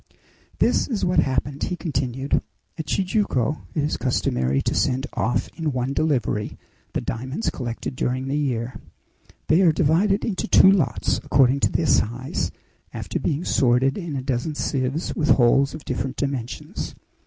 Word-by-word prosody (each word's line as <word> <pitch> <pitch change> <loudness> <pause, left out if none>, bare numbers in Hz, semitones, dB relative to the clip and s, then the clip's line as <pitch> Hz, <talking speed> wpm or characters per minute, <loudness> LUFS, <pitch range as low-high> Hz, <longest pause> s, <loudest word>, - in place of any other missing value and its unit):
"This - - +2
is 225 -7 -1
what 180 - +3
happened," 140 +1 0
he 180 - -1
continued. 135 -5 -1 0.3
"At 160 - -6
Tijuco 180 - 0
it 150 - +1
is 150 - -1
customary 65 - 0
to - - 0
send 130 +1 +1
off 120 - 0
in 160 -3 -1
one 130 +1 -1
delivery 125 -9 0 0.4
the - - -1
diamonds 130 - -3
collected 120 +1 -5
during 130 +1 -1
the 135 - -1
year. 125 -4 -2 0.6
They 160 +4 +4
are 175 -4 +6
divided 175 +7 +2
into 200 -5 -2
two 190 +2 +7
lots, 145 - +1
according 135 0 +3
to - - +1
their 165 - 0
size, 125 -1 0 0.4
after - - -4
being 155 +2 -1
sorted 130 +1 +3
in 170 -7 -5
a 130 - -3
dozen 135 +3 -2
sieves 135 +3 -2
with 155 -3 0
holes 135 +3 +4
of 155 - -10
different 130 +1 -3
dimensions. 135 -4 -4
135 Hz, 155 wpm, -23 LUFS, 125-160 Hz, 0.6 s, two